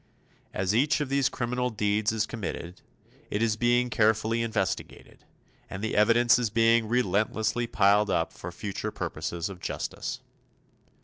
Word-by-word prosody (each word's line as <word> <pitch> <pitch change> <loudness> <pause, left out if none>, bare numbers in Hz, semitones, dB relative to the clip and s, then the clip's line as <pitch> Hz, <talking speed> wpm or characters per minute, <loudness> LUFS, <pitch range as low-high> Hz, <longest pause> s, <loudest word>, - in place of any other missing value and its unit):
As 95 +1 -1
each 140 +7 +2
of 145 -3 -2
these 140 -1 +2
criminal 125 +1 -2
deeds 105 -1 0
is 110 -1 0
committed, 90 -6 -6 0.5
it 105 +2 -1
is 110 -2 +1
being 120 +2 +2
carefully 110 +1 +2
investigated; 110 -5 -4 0.4
and 95 +2 -6
the 110 - -2
evidence 115 +3 +5
is 120 -3 0
being 115 +1 +3
relentlessly 110 +1 0
piled 105 0 +3
up 80 - 0
for 85 - -8
the 85 - -13
future 100 -3 -4
purposes 85 0 -4
of 95 -3 -9
justice. - - -4
110 Hz, 145 wpm, -27 LUFS, 105-120 Hz, 0.5 s, evidence